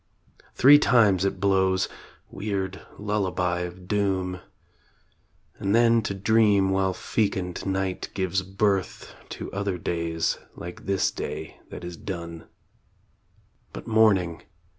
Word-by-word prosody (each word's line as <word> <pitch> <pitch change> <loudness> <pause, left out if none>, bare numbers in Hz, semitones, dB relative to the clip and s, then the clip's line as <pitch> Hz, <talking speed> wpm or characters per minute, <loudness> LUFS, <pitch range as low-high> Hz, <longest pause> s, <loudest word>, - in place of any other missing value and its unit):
Three 145 +3 +8
times 105 -9 +4
it 95 -1 -1
blows 95 -1 +2 0.4
weird 95 -2 -3 0.2
lullaby 95 -4 -1
of 90 +1 -7
doom 95 -3 0 1.2
And 100 +2 +1
then 115 -1 +5
to 100 -2 -3
dream 100 -1 +3
while 95 -1 +1
fecund 95 -5 -2
Night 95 -1 -2
gives 95 0 0
birth 95 0 -1 0.2
To - - -7
other 100 -2 -2
days 85 -1 -1 0.2
like 90 +2 -9
this 95 -1 +1
day - - -6
that - - -9
is 85 -1 -7
done.. 85 -3 -7 1.3
But - - -8
Morning 100 -7 +3
95 Hz, 115 wpm, -25 LUFS, 90-100 Hz, 1.3 s, Three